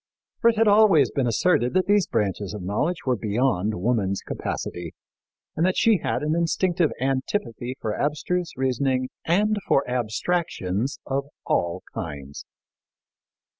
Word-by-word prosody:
For 230 Hz, -, +5 dB
it 230 Hz, -, 0 dB
had 225 Hz, 0 st, +4 dB
always 205 Hz, -, +5 dB
been 135 Hz, -3 st, 0 dB
asserted 120 Hz, -, +2 dB
that 185 Hz, -, +3 dB
these 205 Hz, -2 st, +3 dB
branches 105 Hz, -3 st, -1 dB
of 100 Hz, -, -6 dB
knowledge 145 Hz, -, -1 dB
were 130 Hz, -2 st, +2 dB
beyond 110 Hz, -3 st, 0 dB
woman's 100 Hz, -2 st, 0 dB
capacity 85 Hz, -2 st, -5 dB, 0.6 s
and 160 Hz, -, 0 dB
that 185 Hz, +1 st, +2 dB
she 225 Hz, -5 st, +4 dB
had 130 Hz, -, -2 dB
an 155 Hz, +1 st, +1 dB
instinctive 170 Hz, 0 st, +1 dB
antipathy 130 Hz, -, -2 dB
for 110 Hz, -, -2 dB
abstruse 155 Hz, +7 st, -1 dB
reasoning 130 Hz, 0 st, 0 dB, 0.2 s
and 210 Hz, +5 st, +2 dB
for 135 Hz, -, +2 dB
abstractions 125 Hz, -, -1 dB
of 135 Hz, +1 st, -1 dB, 0.2 s
all 85 Hz, -1 st, 0 dB
kinds. 70 Hz, -1 st, -6 dB
130 Hz, 135 wpm, -24 LUFS, 105-175 Hz, 0.6 s, For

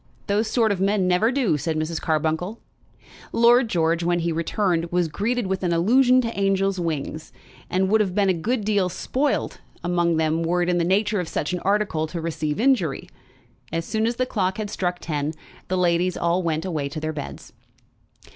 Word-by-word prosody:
"Those 210 Hz, +2 st, +1 dB
sort 225 Hz, -1 st, +2 dB
of 190 Hz, -2 st, -1 dB
men 195 Hz, -1 st, +2 dB
never 180 Hz, +6 st, +3 dB
do," 245 Hz, -, +1 dB
said 160 Hz, +2 st, -2 dB
Mrs. 155 Hz, +1 st, -2 dB
Carbuncle. 160 Hz, +7 st, -1 dB, 0.7 s
Lord 240 Hz, +1 st, +5 dB
George, 165 Hz, -2 st, +1 dB
when 175 Hz, 0 st, +1 dB
he 170 Hz, 0 st, 0 dB
returned, 170 Hz, +1 st, 0 dB
was 175 Hz, -1 st, +1 dB
greeted 230 Hz, +8 st, -1 dB
with 190 Hz, 0 st, -2 dB
an 175 Hz, -2 st, 0 dB
allusion 250 Hz, +9 st, +4 dB
to 230 Hz, -1 st, -4 dB
angels' 195 Hz, -1 st, +1 dB
wings, 155 Hz, -2 st, -4 dB, 0.4 s
and 190 Hz, +1 st, +1 dB
would 215 Hz, +2 st, +3 dB
have 190 Hz, -3 st, -1 dB
been 205 Hz, -2 st, +3 dB
a 190 Hz, -, +4 dB
good 215 Hz, +6 st, -2 dB
deal 205 Hz, -4 st, +2 dB
spoilt 270 Hz, +10 st, -1 dB, 0.2 s
among 175 Hz, -1 st, +1 dB
them 160 Hz, +1 st, +1 dB
were 175 Hz, +2 st, +1 dB
it 175 Hz, -, -1 dB
in 175 Hz, -1 st, +2 dB
the -, -, +2 dB
nature 205 Hz, +4 st, +1 dB
of 180 Hz, -, -3 dB
such 150 Hz, -, -2 dB
an 180 Hz, -, -1 dB
article 195 Hz, -6 st, 0 dB
to 170 Hz, +2 st, -5 dB
receive 155 Hz, -2 st, -3 dB
injury. 225 Hz, -, +1 dB, 0.6 s
As 165 Hz, 0 st, -2 dB
soon 220 Hz, +1 st, 0 dB
as 235 Hz, -, -1 dB
the 255 Hz, -, 0 dB
clock 190 Hz, -6 st, -1 dB
had 210 Hz, -2 st, -4 dB
struck 180 Hz, -3 st, -1 dB
ten 150 Hz, -2 st, -3 dB, 0.3 s
the 185 Hz, -, -1 dB
ladies 180 Hz, 0 st, +1 dB
all 170 Hz, +2 st, +1 dB
went 160 Hz, -1 st, -1 dB
away 155 Hz, -6 st, -2 dB
to 155 Hz, -, -5 dB
their 155 Hz, 0 st, -3 dB
beds. 145 Hz, -2 st, -8 dB
180 Hz, 195 wpm, -23 LUFS, 165-210 Hz, 0.7 s, Lord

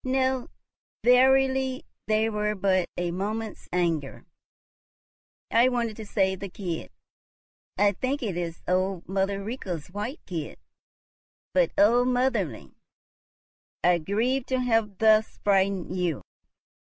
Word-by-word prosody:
"No, 260 Hz, -1 st, 0 dB, 0.5 s
verily; 265 Hz, +1 st, +4 dB, 0.2 s
they 215 Hz, +1 st, +2 dB
were 210 Hz, -1 st, -1 dB
but 185 Hz, -2 st, +1 dB
a 175 Hz, -1 st, -1 dB
moment's 210 Hz, +4 st, -4 dB
anger. 165 Hz, -6 st, -1 dB, 1.3 s
I 240 Hz, +2 st, +5 dB
wanted 235 Hz, -3 st, -1 dB
to 220 Hz, -2 st, -8 dB
save 190 Hz, -2 st, +1 dB
the 200 Hz, -, -6 dB
kid. 180 Hz, -3 st, -5 dB, 0.9 s
I 205 Hz, 0 st, +4 dB
think 260 Hz, +7 st, -2 dB
it 200 Hz, -6 st, -2 dB
is 170 Hz, -1 st, -4 dB
old 185 Hz, 0 st, 0 dB
mother 195 Hz, +1 st, -1 dB
Rika's 190 Hz, -, -5 dB
white 210 Hz, -, -4 dB
kid. 165 Hz, -5 st, -5 dB, 1.0 s
But -, -, +3 dB
oh, 235 Hz, +4 st, +5 dB
motherling! 250 Hz, -, -1 dB, 1.1 s
I 175 Hz, -1 st, +4 dB
grieve 235 Hz, +10 st, 0 dB
to 260 Hz, -1 st, 0 dB
have 225 Hz, -5 st, +1 dB
thus 220 Hz, 0 st, +3 dB
frightened 195 Hz, -2 st, +1 dB
you." 175 Hz, -5 st, -1 dB
210 Hz, 115 wpm, -26 LUFS, 185-245 Hz, 1.3 s, I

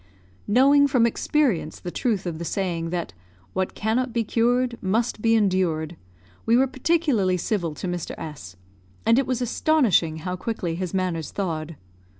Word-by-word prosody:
Knowing 280 Hz, +6 st, +5 dB
from 255 Hz, -4 st, +3 dB
experience 235 Hz, -, 0 dB
the 175 Hz, -, -6 dB
truth 210 Hz, -4 st, -1 dB
of 165 Hz, -2 st, -4 dB
the -, -, -4 dB
saying 170 Hz, -2 st, -2 dB
that 170 Hz, -, -3 dB, 0.4 s
"what 190 Hz, 0 st, -2 dB
cannot 235 Hz, +4 st, 0 dB
be 230 Hz, 0 st, 0 dB
cured 240 Hz, +2 st, +1 dB
must 220 Hz, +3 st, 0 dB
be 225 Hz, 0 st, +3 dB
endured," 180 Hz, -6 st, +1 dB, 0.5 s
we 230 Hz, +1 st, +3 dB
were 265 Hz, -, +5 dB
particularly 265 Hz, -, +1 dB
civil 175 Hz, -4 st, -2 dB
to -, -, -6 dB
Mr. 175 Hz, -2 st, -4 dB
S; 140 Hz, -, -8 dB, 0.5 s
and 230 Hz, +3 st, +5 dB
it 275 Hz, -, -1 dB
was 255 Hz, -1 st, -1 dB
astonishing 240 Hz, -, +2 dB
how 180 Hz, +3 st, -4 dB
quickly 185 Hz, -3 st, -3 dB
his 180 Hz, 0 st, -3 dB
manners 180 Hz, -5 st, -2 dB
thawed. 165 Hz, -4 st, -3 dB
195 Hz, 160 wpm, -24 LUFS, 170-245 Hz, 0.5 s, Knowing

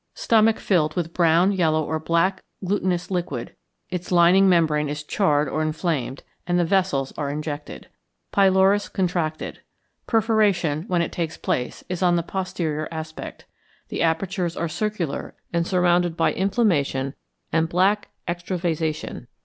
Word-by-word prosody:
Stomach 225 Hz, -1 st, +3 dB
filled 155 Hz, -6 st, +1 dB
with 170 Hz, -2 st, -2 dB
brown, 170 Hz, +2 st, +4 dB
yellow, 160 Hz, -5 st, +2 dB
or 160 Hz, +1 st, -2 dB
black 170 Hz, +4 st, +1 dB, 0.2 s
glutinous 185 Hz, -2 st, -1 dB
liquid; 180 Hz, -2 st, -3 dB, 0.4 s
its 180 Hz, 0 st, -4 dB
lining 180 Hz, +2 st, +6 dB
membrane 155 Hz, -4 st, +2 dB
is 150 Hz, +1 st, -4 dB
charred 150 Hz, -3 st, +1 dB
or 155 Hz, -, -2 dB
inflamed, 155 Hz, -4 st, -2 dB, 0.2 s
and 175 Hz, 0 st, +2 dB
the 175 Hz, -, +3 dB
vessels 165 Hz, -7 st, +1 dB
are 145 Hz, -2 st, -1 dB
injected. 150 Hz, 0 st, -5 dB, 0.4 s
Pylorus 195 Hz, +1 st, +4 dB
contracted. 170 Hz, -4 st, -2 dB, 0.5 s
Perforation, 210 Hz, -9 st, +2 dB
when 175 Hz, -2 st, +1 dB
it -, -, -4 dB
takes 170 Hz, -1 st, -3 dB
place, 125 Hz, -, -2 dB
is 180 Hz, 0 st, -4 dB
on 175 Hz, -1 st, +4 dB
the 170 Hz, -, 0 dB
posterior 165 Hz, -4 st, -3 dB
aspect; 160 Hz, -1 st, -7 dB, 0.4 s
the -, -, -3 dB
apertures 170 Hz, +1 st, 0 dB
are 170 Hz, -, -1 dB
circular, 175 Hz, -2 st, -3 dB, 0.2 s
and 170 Hz, 0 st, +1 dB
surrounded 175 Hz, -2 st, +2 dB
by 165 Hz, -, +2 dB
inflammation 170 Hz, -, +1 dB, 0.4 s
and 165 Hz, 0 st, +2 dB
black 190 Hz, +4 st, +2 dB, 0.2 s
extravasation. 170 Hz, -6 st, -3 dB
170 Hz, 135 wpm, -23 LUFS, 155-185 Hz, 0.5 s, lining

